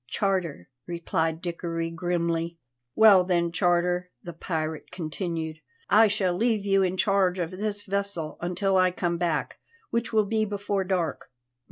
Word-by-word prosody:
"Charter," 180 Hz, -, -1 dB, 0.2 s
replied 165 Hz, -1 st, -2 dB
Dickory 170 Hz, -1 st, -3 dB
grimly. 170 Hz, -1 st, -1 dB, 0.4 s
"Well 210 Hz, -4 st, +7 dB
then, 175 Hz, -2 st, +1 dB
Charter," 175 Hz, +1 st, +1 dB
the 175 Hz, -, -7 dB
pirate 160 Hz, -2 st, -4 dB
continued, 160 Hz, -1 st, -4 dB, 0.3 s
"I 220 Hz, +1 st, +7 dB
shall 195 Hz, -4 st, 0 dB
leave 220 Hz, 0 st, +1 dB
you 195 Hz, -1 st, +3 dB
in 185 Hz, 0 st, 0 dB
charge 195 Hz, -2 st, +2 dB
of 170 Hz, -2 st, -2 dB
this 205 Hz, +2 st, -3 dB
vessel 200 Hz, -6 st, -2 dB
until 190 Hz, +2 st, +1 dB
I 185 Hz, 0 st, +5 dB
come 175 Hz, -1 st, -2 dB
back, 165 Hz, -4 st, -1 dB, 0.3 s
which 235 Hz, 0 st, -1 dB
will 215 Hz, -2 st, +3 dB
be 220 Hz, +1 st, 0 dB
before 200 Hz, -1 st, -1 dB
dark." 180 Hz, -4 st, -2 dB
180 Hz, 145 wpm, -26 LUFS, 170-200 Hz, 0.4 s, Well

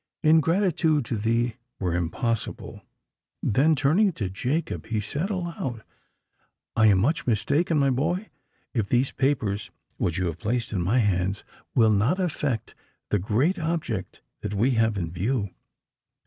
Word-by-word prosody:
Ingratitude 160 Hz, -, +3 dB
to 115 Hz, -, -2 dB
thee 115 Hz, +2 st, 0 dB, 0.2 s
were 90 Hz, -3 st, -1 dB
impossible!"—Then, 115 Hz, -, -2 dB
turning 170 Hz, +9 st, +3 dB
to 100 Hz, -10 st, -3 dB
Jacob, 130 Hz, -, -2 dB
he 110 Hz, -1 st, -1 dB
said 145 Hz, -, -2 dB
aloud, 170 Hz, -, -4 dB, 0.9 s
"I 110 Hz, -1 st, +5 dB
am 100 Hz, -3 st, +5 dB
much 135 Hz, -, +1 dB
mistaken, 145 Hz, -, +2 dB
my 140 Hz, -2 st, +3 dB
boy, 170 Hz, -, -1 dB, 0.4 s
if 110 Hz, -5 st, -1 dB
these 125 Hz, +2 st, +2 dB
papers 120 Hz, -8 st, 0 dB, 0.3 s
which 85 Hz, 0 st, -1 dB
you 90 Hz, -, 0 dB
have 85 Hz, -1 st, -3 dB
placed 120 Hz, +3 st, -2 dB
in 95 Hz, -, 0 dB
my 100 Hz, +9 st, +2 dB
hands 95 Hz, -3 st, +1 dB, 0.3 s
will 110 Hz, -3 st, +5 dB
not 120 Hz, -, +2 dB
effect 145 Hz, -, -2 dB, 0.4 s
the 105 Hz, -, +3 dB
great 130 Hz, -, +1 dB
object 150 Hz, -, -3 dB, 0.2 s
that 105 Hz, -, -4 dB
we 120 Hz, +7 st, +3 dB
have 110 Hz, -3 st, +2 dB
in 85 Hz, -3 st, -3 dB
view." 100 Hz, +3 st, -1 dB
120 Hz, 140 wpm, -26 LUFS, 105-155 Hz, 0.9 s, I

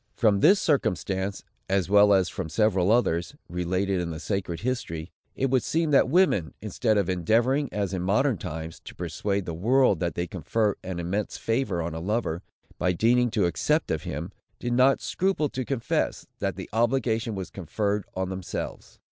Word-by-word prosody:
From 105 Hz, -3 st, +3 dB
this 195 Hz, -, +6 dB
circumstance, 95 Hz, -, 0 dB, 0.3 s
as 95 Hz, -1 st, +1 dB
well 105 Hz, +1 st, +6 dB
as 95 Hz, -2 st, +4 dB
from 95 Hz, -4 st, -5 dB
several 95 Hz, 0 st, +2 dB
others, 85 Hz, -8 st, +1 dB
related 90 Hz, +2 st, -1 dB
in 85 Hz, -, -3 dB
the 80 Hz, -1 st, -5 dB
sacred 90 Hz, -3 st, -3 dB
history, 95 Hz, -9 st, -3 dB, 0.2 s
it 135 Hz, -1 st, 0 dB
would 130 Hz, -2 st, +4 dB
seem 160 Hz, -1 st, 0 dB
that 135 Hz, -2 st, +5 dB
women, 115 Hz, -, +2 dB
instead 110 Hz, -1 st, 0 dB
of 100 Hz, -3 st, +1 dB
endeavoring, 115 Hz, -, +2 dB
as 100 Hz, -2 st, -2 dB
in 95 Hz, -, -2 dB
modern 105 Hz, -, +2 dB
times, 80 Hz, +1 st, -6 dB
to -, -, -9 dB
persuade 100 Hz, -2 st, -2 dB
the 85 Hz, -, -4 dB
world 115 Hz, +2 st, +3 dB
that 85 Hz, -2 st, -2 dB
they 85 Hz, -, -1 dB
confer 100 Hz, +4 st, -1 dB
an 90 Hz, -1 st, -4 dB
immense 95 Hz, +5 st, -2 dB
favor 115 Hz, -7 st, -1 dB
on 85 Hz, 0 st, -4 dB
a 80 Hz, -, -4 dB
lover, 95 Hz, -2 st, -1 dB, 0.4 s
by 90 Hz, +1 st, +2 dB
deigning 120 Hz, +6 st, +3 dB
to 105 Hz, -5 st, +1 dB
accept 85 Hz, -, +1 dB
of -, -, -1 dB
him, 85 Hz, +7 st, -5 dB, 0.3 s
did 120 Hz, 0 st, -2 dB
not 130 Hz, +2 st, +4 dB
scruple 185 Hz, -6 st, 0 dB
to 130 Hz, -, -3 dB
confess, 125 Hz, -2 st, -1 dB
that -, -, -1 dB
the -, -, -7 dB
obligation 115 Hz, -1 st, +1 dB
was 95 Hz, -2 st, -5 dB
conferred 100 Hz, +3 st, -2 dB
on 95 Hz, 0 st, -2 dB
themselves. 95 Hz, -1 st, -6 dB
100 Hz, 180 wpm, -26 LUFS, 90-120 Hz, 0.4 s, this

